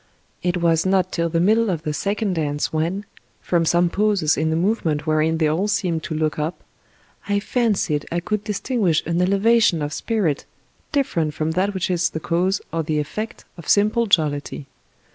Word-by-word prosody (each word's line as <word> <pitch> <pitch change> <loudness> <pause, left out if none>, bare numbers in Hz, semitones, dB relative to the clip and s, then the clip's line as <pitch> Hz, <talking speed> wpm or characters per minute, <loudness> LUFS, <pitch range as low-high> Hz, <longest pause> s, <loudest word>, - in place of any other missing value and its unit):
It 180 0 0
was 165 -2 +2
not 190 -1 +1
till 170 -1 0
the 165 0 0
middle 220 +5 +3
of 165 -4 -2
the 150 - -2
second 200 +3 -1
dance 150 -3 -2
when, 170 +6 -1 0.3
from 170 -2 0
some 175 +2 +3
pauses 195 -4 +1
in 160 +1 0
the 160 - 0
movement 165 -5 0
wherein 155 +1 +1
they 160 -1 +2
all 165 +7 0
seemed 180 -6 0
to 160 - -4
look 155 -1 -1
up, 155 +4 -3 0.7
I 205 0 +2
fancied 200 - 0
I 170 - 0
could 210 +3 -2
distinguish 210 - 0
an 170 +2 0
elevation 200 0 +3
of 145 +1 -3
spirit 195 -11 -1 0.5
different 170 - 0
from 155 0 -1
that 190 +4 0
which 185 0 -1
is 180 0 +1
the 160 - -5
cause 180 +5 0
or 165 - 0
the 155 -1 -1
effect 215 +10 -4
of 165 - -9
simple 215 +3 +3
jollity. 150 -6 0
175 Hz, 180 wpm, -22 LUFS, 160-205 Hz, 0.7 s, middle